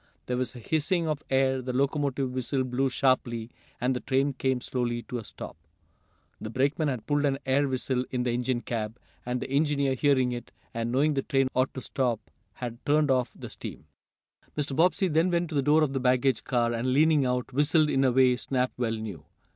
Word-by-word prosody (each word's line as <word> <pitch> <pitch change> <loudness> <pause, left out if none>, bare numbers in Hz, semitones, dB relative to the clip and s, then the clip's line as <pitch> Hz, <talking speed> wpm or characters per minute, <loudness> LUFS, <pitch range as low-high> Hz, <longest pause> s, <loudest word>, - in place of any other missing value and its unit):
There 125 - -1
was 130 +1 -2
a - - -8
hissing 160 - 0
of 150 -2 -1
air, 130 0 +2
the 125 0 -4
locomotive 140 -1 0
whistle 130 +1 -1
blew 130 +1 0
sharply, 125 -3 0 0.3
and 125 +2 +1
the - - -1
train 135 +2 +1
came 130 -1 0
slowly 120 -1 -2
to 125 - -5
a - - -7
stop. - - -9 0.8
The 110 - -6
brakeman 140 +6 +1
had 125 -6 -3
pulled 145 +2 +1
an 140 -2 +2
air 140 +2 +2
whistle 130 -1 -1
in 125 -1 -1
the 125 - 0
engine 125 0 -1
cab, 115 -1 -4 0.3
and 125 0 -1
the - - -5
engineer, 140 -1 +2
hearing 130 -2 +2
it, 120 -1 -6 0.2
and 115 0 -2
knowing 145 +4 +3
the 135 - 0
train 135 -1 +1
ought 130 +1 +1
to 130 - -4
stop, 125 -5 -2 0.2
had 120 0 -7
turned 150 -1 +3
off 125 -2 +2
the - - -8
steam. - - -8 0.7
Mr. 145 -2 -1
Bobbsey 180 +4 +3
then 165 +2 +2
went 170 -1 0
to 160 - -5
the 140 - +3
door 150 +3 +4
of 140 -3 0
the 135 - 0
baggage 130 0 +2
car, 120 -2 +1
and, 125 +2 0
leaning 155 0 +4
out, 125 0 -1
whistled 150 +3 +3
in 135 - +2
a 130 - +4
way 130 0 +5
Snap 130 0 -1
well 115 -2 0
knew. 105 -9 -6
130 Hz, 210 wpm, -28 LUFS, 125-140 Hz, 0.8 s, way